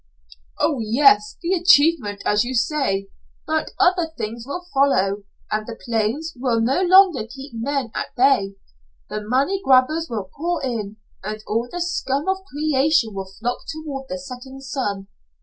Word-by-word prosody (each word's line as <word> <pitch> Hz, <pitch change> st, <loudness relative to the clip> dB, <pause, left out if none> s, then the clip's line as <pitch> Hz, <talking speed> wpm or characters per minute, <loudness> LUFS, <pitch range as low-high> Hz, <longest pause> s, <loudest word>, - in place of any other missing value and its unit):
"Oh, 285 Hz, -5 st, +1 dB
yes, 220 Hz, -1 st, +4 dB
the 345 Hz, +3 st, +1 dB
achievement, 310 Hz, -, +4 dB
as 210 Hz, +1 st, +3 dB
you 255 Hz, +2 st, -4 dB
say. 225 Hz, -7 st, 0 dB, 0.3 s
But 315 Hz, 0 st, -1 dB
other 355 Hz, -2 st, +3 dB
things 230 Hz, +1 st, -5 dB
will 355 Hz, +6 st, -5 dB
follow, 205 Hz, -8 st, +2 dB, 0.3 s
and 215 Hz, 0 st, -1 dB
the 230 Hz, -1 st, -7 dB
plains 235 Hz, +8 st, -1 dB
will 245 Hz, -2 st, 0 dB
no 255 Hz, +9 st, +1 dB
longer 365 Hz, -, +5 dB
keep 270 Hz, +4 st, -10 dB
men 250 Hz, +1 st, -2 dB
at -, -, -5 dB
bay. 240 Hz, -7 st, +3 dB, 0.6 s
The 215 Hz, -, -3 dB
money 270 Hz, -, 0 dB
grabbers 290 Hz, +5 st, +3 dB
will 205 Hz, -5 st, -5 dB
pour 340 Hz, -1 st, -2 dB
in, 215 Hz, -4 st, -4 dB, 0.3 s
and 215 Hz, +1 st, -5 dB
all 230 Hz, +3 st, -1 dB
the 355 Hz, -, -4 dB
scum 290 Hz, -4 st, -1 dB
of 380 Hz, 0 st, +2 dB
creation 290 Hz, -, +1 dB
will 195 Hz, -1 st, -5 dB
flock 245 Hz, +2 st, -2 dB
toward 290 Hz, -4 st, -6 dB
the 275 Hz, -, -3 dB
setting 265 Hz, 0 st, -9 dB
sun. 250 Hz, -8 st, -3 dB
260 Hz, 155 wpm, -22 LUFS, 220-305 Hz, 0.6 s, longer